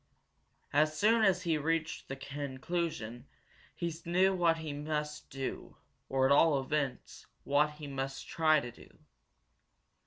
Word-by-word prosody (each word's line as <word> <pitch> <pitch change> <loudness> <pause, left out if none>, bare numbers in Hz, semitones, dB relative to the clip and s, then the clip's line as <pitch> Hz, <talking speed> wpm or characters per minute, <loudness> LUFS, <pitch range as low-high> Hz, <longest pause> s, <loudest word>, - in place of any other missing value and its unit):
As 155 +1 +3
soon 220 +5 +4
as 185 -3 +3
he 165 -4 +1
reached 160 +1 -1
that 135 0 -7
conclusion 140 -3 -4 0.5
he 170 -1 -2
knew 185 +3 +3
what 170 -3 +3
he 160 -2 -5
must 150 +1 -4
do, 135 -1 -5 0.3
or, 130 0 +2
at 135 - +3
all 145 0 +5
events, 135 -1 -3 0.2
what 150 +2 +2
he 150 0 -9
must 135 -1 -4
try 155 -2 +3
to 120 -3 -6
do. - - -16
150 Hz, 135 wpm, -32 LUFS, 135-165 Hz, 0.5 s, all